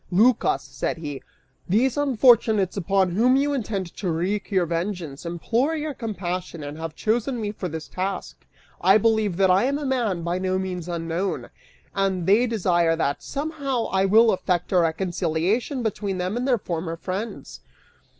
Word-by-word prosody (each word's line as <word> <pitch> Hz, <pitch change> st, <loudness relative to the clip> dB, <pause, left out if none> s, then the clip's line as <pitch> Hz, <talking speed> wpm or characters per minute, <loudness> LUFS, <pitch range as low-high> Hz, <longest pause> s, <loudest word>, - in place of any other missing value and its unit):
("Lycas," 225 Hz, +6 st, +3 dB
said -, -, -3 dB
he, 145 Hz, -4 st, -6 dB, 0.5 s
"these 240 Hz, +7 st, +3 dB
unfortunates 235 Hz, -8 st, +4 dB
upon 195 Hz, -1 st, +1 dB
whom 240 Hz, +8 st, +4 dB
you 285 Hz, +1 st, +2 dB
intend 200 Hz, -9 st, -3 dB
to 185 Hz, -4 st, -1 dB
wreak 185 Hz, +6 st, -1 dB
your 190 Hz, -4 st, +2 dB
vengeance, 170 Hz, -3 st, -4 dB
implore 235 Hz, -, 0 dB
your 305 Hz, -1 st, -3 dB
compassion 185 Hz, -, -4 dB
and) 145 Hz, +1 st, -6 dB
have 160 Hz, -1 st, -6 dB
chosen 235 Hz, +3 st, 0 dB
me 210 Hz, -2 st, -2 dB
for 190 Hz, -3 st, -5 dB
this 160 Hz, 0 st, -6 dB
task. 190 Hz, +1 st, -5 dB, 0.4 s
I 190 Hz, +3 st, +7 dB
believe 220 Hz, -4 st, +1 dB
that 190 Hz, -1 st, +4 dB
I 190 Hz, +6 st, +4 dB
am 280 Hz, +2 st, +1 dB
a 295 Hz, -, -4 dB
man, 230 Hz, -10 st, 0 dB
by 175 Hz, +2 st, -1 dB
no 185 Hz, 0 st, 0 dB
means 180 Hz, -2 st, -4 dB
unknown, 170 Hz, +3 st, -3 dB, 0.4 s
and 190 Hz, -3 st, 0 dB
they 215 Hz, +7 st, +4 dB
desire 175 Hz, -7 st, +2 dB
that, 145 Hz, -3 st, -1 dB
somehow, 280 Hz, -4 st, -3 dB
I 190 Hz, 0 st, +2 dB
will 220 Hz, +3 st, +6 dB
effect 180 Hz, -2 st, -1 dB
a 185 Hz, -, +4 dB
reconciliation 175 Hz, -, 0 dB
between 205 Hz, -3 st, -2 dB
them 180 Hz, +3 st, -2 dB
and 250 Hz, +2 st, -1 dB
their 250 Hz, -3 st, +3 dB
former 165 Hz, -4 st, -4 dB
friends. 190 Hz, +6 st, -5 dB
195 Hz, 165 wpm, -24 LUFS, 175-230 Hz, 0.5 s, I